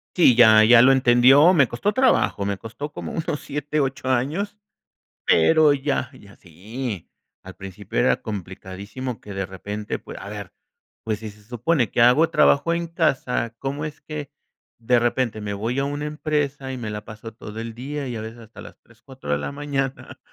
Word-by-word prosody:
Sí, 160 -9 +6
ya, 110 -2 +7
ya 115 +1 +7
lo 135 - +7
entendió, 135 +6 +6
me 140 -6 +5
costó 120 - -1
trabajo, 240 - +2
me 100 -1 -2
costó 140 +7 -7
como - - -7
unos 155 -2 -3
7, 150 +1 -3
8 135 -2 -2
años, 150 +12 -1 0.7
pero 155 - +5
ya, 140 -3 -2
ya, 100 0 -16
sí. 100 +4 -7 0.4
Al 95 0 -11
principio 95 -6 -6
era 65 +1 +2
complicadísimo 100 +5 -7
que, 100 -2 -9
de 95 0 -2
repente, 100 +3 -6
pue - - -11
a 100 - -8
ver, 100 -3 -8 0.5
pues 110 -2 -2
si 110 -1 -7
se 105 0 -17
supone 120 +2 0
que - - +1
hago 125 +7 +5
trabajo 165 +4 +3
en 170 0 -2
casa, 140 -8 -1
¿cómo 140 +2 -3
es 150 -1 -8
que 150 -2 -7 0.5
de 120 +1 +2
repente 120 -2 0
me 105 -1 -4
voy 115 +6 -3
a 140 - +1
una 145 +1 -3
empresa 145 -3 -2
y - - -5
me 115 -3 -5
la 105 0 -6
paso 110 +1 -10
todo 110 -1 -9
el 115 0 -6
día, 140 +3 -5
y 120 - -5
a 110 - -5
veces 110 +2 -8
hasta 115 0 -13
las - - -13
3, 115 0 -25
4 130 - -11
de 75 - +2
la 70 - -4
mañana 140 -2 -4
120 Hz, 190 wpm, -23 LUFS, 105-145 Hz, 0.7 s, ya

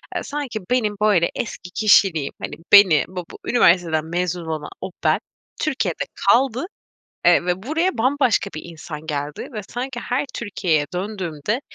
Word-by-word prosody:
eee, - - -2
sanki 280 -6 -4
benim 215 -5 +1
böyle 200 -6 +4
eski 195 -5 -5
kişiliğim, 195 -8 +3
hani, - - -5 0.2
beni 195 -7 +7
bu 180 -1 -6 0.2
üniversiteden 170 -8 +3
mezun 175 0 -2
olan 155 -2 -4
o 190 0 -5
ben - - +3 0.4
Türkiye'de 305 -3 -1 0.3
kaldı, 260 +3 +3 0.6
eee, - - +5
ve 180 +1 -1
buraya 320 - 0
bambaşka 255 -4 +2
bir 155 - -6
insan 160 -2 -9
geldi 145 -1 -4
ve 215 - -4
sanki 245 +1 -4
her 260 +5 -1
Türkiye'ye 175 -9 0
döndüğümde, 190 - -3
195 Hz, 145 wpm, -21 LUFS, 165-240 Hz, 0.6 s, beni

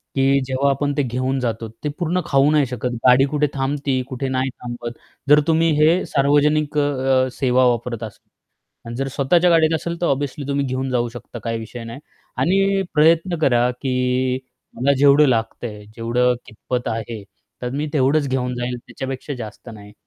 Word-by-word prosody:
की 135 0 +3
जेव्हा 135 +2 +1
आपण 145 +1 0
ते 145 - +2
घेऊन 130 +2 -1
जातो 115 -2 -3 0.2
ते 150 - -1
पूर्ण 175 +2 0
खाऊ 140 +1 +3
नाही 150 -2 +3
शकत. 125 -1 -3 0.2
गाडी 125 +2 +6
कुठे 150 +1 +1
थांबती, 135 -1 -1
कुठे 130 +1 -3
नाही 130 0 0
थांबत. 120 -1 -7 0.3
जर 150 +1 +8
तुम्ही 165 0 +3
हे 165 +4 +4
सार्वजनिक 145 +2 +2
अ, - - +4 0.4
अ, - - -3
सेवा 130 -1 +3
वापरत 120 -1 -1
असाल. 110 -2 -10 0.6
आणि 115 0 -6
जर 135 +1 -2
स्वतःच्या 170 +6 +3
गाडीत 165 -1 +4
असेल 170 +2 -4
तर 175 - +2
ऑब्व्हियसली 140 0 -2
तुम्ही 140 0 0
घेऊन 130 0 -2
जाऊ 120 -1 0
शकता 120 0 -9
काही 115 -1 -2
विषय 115 +1 -8
नाही 115 +4 -8 0.4
आणि 195 +2 +2
प्रयत्न 165 +3 +3
करा, 125 -3 +3
की 125 0 -1 0.4
मला 140 +3 +2
जेवढं 145 +1 +6
लागतंय, 110 -3 -2
जेवढं 125 +2 +1
कितपत 125 +3 -4
आहे, 110 -1 -5 0.4
तर 125 - -2
मी 150 +2 -2
तेवढंच 140 +1 +2
घेऊन 125 -1 -1
जाईल, 125 0 -3
त्याच्यापेक्षा 135 +2 -5
जास्त 120 0 -9
नाही. 105 -1 -12
130 Hz, 175 wpm, -21 LUFS, 125-145 Hz, 0.6 s, जर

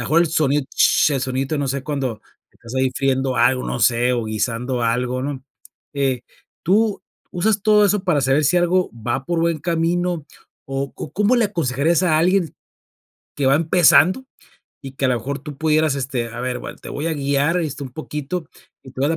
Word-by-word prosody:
mejor 165 +2 +2
el - - +1
sonido 150 -3 +1
sh, - - +4
el 135 - -1
sonidito 130 +3 -2
no 140 -1 -1
sé, 135 +1 -2
cuando 135 -7 -3 0.3
estás 115 +2 -12
ahí 130 0 +2
friendo 130 -1 0
algo, 125 +2 +2
no - - -3
sé, 120 +1 +3
o 120 -2 -1
guisando 115 +3 -2
algo, 125 +2 0
¿no? 135 -1 -5 0.5
Eh, 135 -3 0 0.4
tú 210 +3 +2 0.3
usas 200 +3 0
todo 210 -1 +5
eso 205 -1 +2
para 170 -6 +2
saber 135 +3 +2
si 150 +5 +3
algo 175 +1 +2
va 120 +3 -3
por 170 +1 -1
buen 165 -1 +1
camino 170 0 -1 0.4
o 135 0 -3
o 140 - -7
cómo 210 +6 +2
le 235 -3 +3
aconsejarías 165 -2 0
a 160 -4 +3
alguien 180 0 +1 0.8
que 140 - 0
va 135 - +5
empezando 175 - +4 0.6
y 135 - -8
que 135 0 -1
a - - +1
lo 125 - +2
mejor 135 +5 -4
tú 145 0 -9
pudieras 155 -2 +2
este, 130 -3 -3
a 120 +1 -7
ver, 125 0 -2
bueno, - - -8
te - - -11
voy 145 +3 -4
a 165 - 0
guiar, 140 +3 +1
este, 150 -3 -4
un 135 - -6
poquito, 155 +3 -5 0.4
y 130 - -12
te 130 - -8
voy 140 - +2
a - - +1
dar 165 - 0
140 Hz, 205 wpm, -20 LUFS, 130-170 Hz, 0.8 s, todo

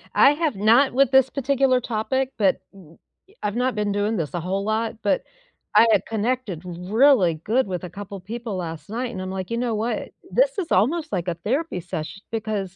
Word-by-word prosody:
I 275 - +7
have 300 -3 -1
not 230 +7 +4
with 270 0 +3
this 265 -1 +5
particular 270 -1 +2
topic, 255 +4 -1
but 195 -4 +3
y 175 -5 -17 0.5
I've 205 0 -1
not 250 0 0
been 210 -1 0
doing 205 +2 0
this 160 -4 -3
a 175 - -1
whole 190 +4 -2
lot, 220 +2 -1
but 205 - +1 0.5
I - - +8
had 205 -3 +4
connected 225 -5 -2
really 185 - +3
good 215 +10 0
with 180 -2 -4
a 180 - -5
couple 200 +2 -8
people 225 +3 -6
last 165 -3 -6
night, 240 +3 -3
and 190 - -6
I'm 185 - -5
like, 190 +1 -5
"You 230 - 0
know 235 -2 -1
what? 225 +3 -2 0.2
This - - +2
is 370 -5 -3
almost 310 - +2
like 175 0 -2
a 170 - -1
therapy 245 - -2
sesh 170 +1 -6
because 210 -4 -3
215 Hz, 200 wpm, -23 LUFS, 185-255 Hz, 0.5 s, I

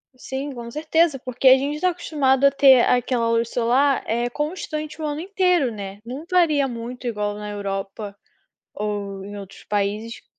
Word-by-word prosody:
Sim, 265 +3 -5
com 235 -1 -7
certeza, 310 +1 +1
porque 255 +1 0
a 260 +1 +9
gente 290 +4 -3
tá 365 - +3
acostumado 280 -6 +1
a 275 - +6
ter 270 -2 +6
aquela 245 -1 +1
luz 230 0 +1
solar, 255 +4 +2
eh, 235 +2 -1
constante 305 +2 -4
o - - -2
ano 295 +1 -3
inteiro, 360 - +1
né. 200 -1 -7
Não 260 +6 -6
varia 310 -6 +3
muito 245 +1 -6
igual 210 -3 -2
na 210 0 -6
Europa, 200 0 -5 0.6
ou 200 -2 -4
em 205 +1 -8
outros 195 -1 -10
países 210 +3 -2
250 Hz, 170 wpm, -22 LUFS, 210-295 Hz, 0.6 s, a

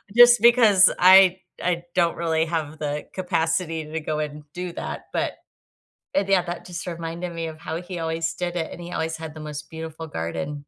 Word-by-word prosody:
just 240 -1 +8
because 225 -6 +6
I 185 0 +7 0.2
I 175 -1 0
don't 170 -2 +2
really 160 -1 +1
have 160 -2 -3
the 150 0 -3
capacity 165 -3 -1
to 160 +1 -4
go 155 0 -2
and 150 0 -4
do 180 0 -5
that, - - -6
but, - - -1 0.8
uh, 200 - +3
yeah, 195 -2 +4
that 175 -1 -6
just 175 0 -7
reminded 170 +1 -5
me 165 -1 -4
of 160 0 -9
how 160 +3 -5
he 175 -1 -7
always 165 0 -2
did 175 -1 -3
it, 160 -2 -2
and - - -9
he 175 +1 -8
always 160 0 -2
had 160 -1 -7
the 155 - -10
most 150 -1 -7
beautiful 160 0 -7
garden. 85 - -4
165 Hz, 195 wpm, -24 LUFS, 160-180 Hz, 0.8 s, just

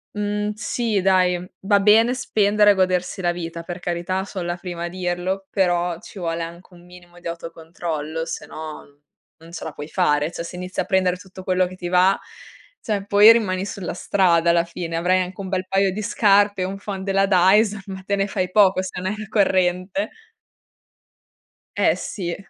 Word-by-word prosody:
Mhmm, 210 0 -1
sì, 215 -1 -1
dai. 185 -2 +3 0.2
Va 200 +1 +3
bene 225 +5 +5
spendere 210 -3 +3
e - - +5
godersi 185 0 0
la 175 -1 +1
vita, 170 -1 -6
per 175 +1 -7
carità 180 +2 -2
so' 195 -2 -6
la 175 0 -2
prima 175 -1 -6
a - - -2
dirlo, 185 +2 -3
però 175 -3 +1
ci - - -13
vuole 165 -2 -3
anche 170 +2 -9
un 175 0 -16
minimo 175 0 -16
di 175 - -8
autocontrollo 165 -1 -5
se - - -6
no, 150 -2 -9 0.4
non 165 +1 -15
ce - - -7
la 160 - -5
puoi 145 +1 -8
fare. 150 +1 +1
Cioè 170 - -5
se 175 - -8
inizi 180 +1 -6
a - - +1
prendere 185 -1 +2
tutto 185 0 -12
quello 185 -1 +1
che 185 - -10
ti 175 -1 -5
va, 185 +2 +4 0.6
cioè 205 -3 -2
poi 205 +2 +8
rimani 195 -5 +1
sulla 190 -3 -5
strada 175 -3 +2
alla 170 0 +3
fine. 170 -1 -5
Avrai 180 +2 +2
anche 180 +1 -6
un 190 - -6
bel 185 0 -2
paio 195 0 +2
di 215 - -4
scarpe, 205 -2 +3
un 195 +2 -4
phon 195 -1 -6
della 195 0 +2
Dyson, 195 +3 +4
ma 190 -1 -7
te 200 +1 0
ne 195 - +1
fai 185 -2 -2
poco 190 -1 +4
se 185 -1 -6
non 185 +2 -2
hai - - -3
la 215 -1 -7
corrente. 185 - +1 1.7
Eh - - +3
sì. 175 -5 -4
185 Hz, 190 wpm, -22 LUFS, 175-195 Hz, 1.7 s, poi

